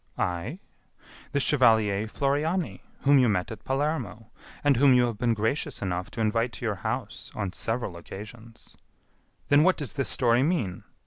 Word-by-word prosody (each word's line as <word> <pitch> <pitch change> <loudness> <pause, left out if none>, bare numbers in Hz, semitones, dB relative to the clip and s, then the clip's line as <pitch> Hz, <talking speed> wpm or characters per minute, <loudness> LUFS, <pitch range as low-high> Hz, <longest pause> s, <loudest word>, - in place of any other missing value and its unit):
"I? 90 - -2 0.7
The 145 - +1
chevalier 110 -7 +3
Floriani, 150 +8 -1 0.2
whom 140 0 +5
you 125 -3 +4
met 90 -1 -1
at 110 - -9
Palermo, 135 -6 -2 0.3
and 145 -1 +4
whom 135 0 +6
you 125 -1 +5
have 115 -4 -4
been 120 -2 +2
gracious 110 +7 -1
enough 90 0 -3
to 115 - -5
invite 115 +2 +1
to - - -6
your 105 -3 -1
house 110 0 -4
on 100 -4 -3
several 115 -4 -3
occasions." 110 +6 -11 0.7
"Then 145 +1 +6
what 185 +3 +4
does 145 -6 -4
this 140 -2 -1
story 120 -1 +3
mean?" 130 - -1
115 Hz, 165 wpm, -27 LUFS, 105-140 Hz, 0.7 s, whom